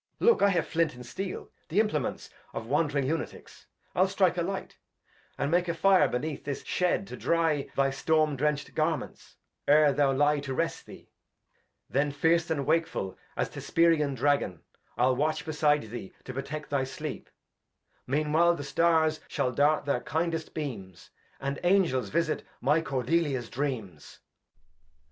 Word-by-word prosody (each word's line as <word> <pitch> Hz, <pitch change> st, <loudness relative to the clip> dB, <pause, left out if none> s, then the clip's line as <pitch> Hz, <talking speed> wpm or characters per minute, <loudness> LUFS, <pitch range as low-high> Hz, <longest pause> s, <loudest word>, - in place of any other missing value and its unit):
Look, 470 Hz, -, +4 dB
I 200 Hz, -, +6 dB
have 175 Hz, -4 st, +1 dB
Flint 165 Hz, -3 st, 0 dB
and 125 Hz, 0 st, -10 dB
Steel, 190 Hz, +9 st, -6 dB, 0.2 s
the 175 Hz, +6 st, +2 dB
Implements 185 Hz, -11 st, -1 dB, 0.2 s
Of -, -, -5 dB
wand' 145 Hz, +5 st, +1 dB
ring 140 Hz, -2 st, 0 dB
Lunaticks; 160 Hz, +3 st, -5 dB, 0.3 s
I'll -, -, +3 dB
strike -, -, +2 dB
a -, -, 0 dB
Light, -, -, -4 dB, 0.6 s
And 140 Hz, -, -1 dB
make 175 Hz, +1 st, +2 dB
a 170 Hz, -, -1 dB
Fire 190 Hz, +3 st, +5 dB
beneath 145 Hz, +4 st, -3 dB
this 140 Hz, -1 st, -4 dB
Shed, 180 Hz, +2 st, 0 dB
to -, -, -8 dB
dry 165 Hz, -4 st, +1 dB
Thy 135 Hz, 0 st, +2 dB
Storm 155 Hz, +2 st, +1 dB
drencht 150 Hz, +1 st, -1 dB
Garments, 155 Hz, -2 st, -2 dB, 0.3 s
'ere 150 Hz, 0 st, +6 dB
thou 140 Hz, 0 st, +3 dB
lie 145 Hz, +2 st, +3 dB
to 135 Hz, -2 st, -4 dB
rest 165 Hz, +3 st, -2 dB
thee; -, -, -13 dB, 0.8 s
Then 140 Hz, +2 st, +1 dB
fierce 160 Hz, +4 st, +2 dB
and 140 Hz, -4 st, -1 dB
wakeful 165 Hz, -, 0 dB, 0.2 s
as -, -, 0 dB
th' -, -, -20 dB
Hesperian 160 Hz, -4 st, +2 dB
Dragon, 130 Hz, -, 0 dB, 0.3 s
I'U 130 Hz, +1 st, +4 dB
watch 150 Hz, +3 st, -1 dB
beside 150 Hz, -2 st, +2 dB
thee 115 Hz, -5 st, -7 dB
to 130 Hz, -, -7 dB
protect 140 Hz, +3 st, -5 dB
thy 140 Hz, -2 st, +1 dB
Sleep; 135 Hz, +3 st, -6 dB, 0.8 s
Mean 150 Hz, +3 st, 0 dB
while 170 Hz, +2 st, +5 dB
the 145 Hz, -, -6 dB
Stars 160 Hz, +2 st, +2 dB
shall 125 Hz, -, -1 dB
dart 145 Hz, +5 st, +2 dB
their 140 Hz, -, +1 dB
kindest 165 Hz, 0 st, -2 dB
Beams, 105 Hz, -, -6 dB, 0.3 s
And 140 Hz, +1 st, -3 dB
Angels 175 Hz, -, +2 dB
visit 165 Hz, +5 st, 0 dB, 0.2 s
my 160 Hz, +2 st, +2 dB
Cordelia's 135 Hz, -2 st, -1 dB
Dreams. 115 Hz, -, -4 dB
150 Hz, 160 wpm, -28 LUFS, 135-165 Hz, 0.8 s, I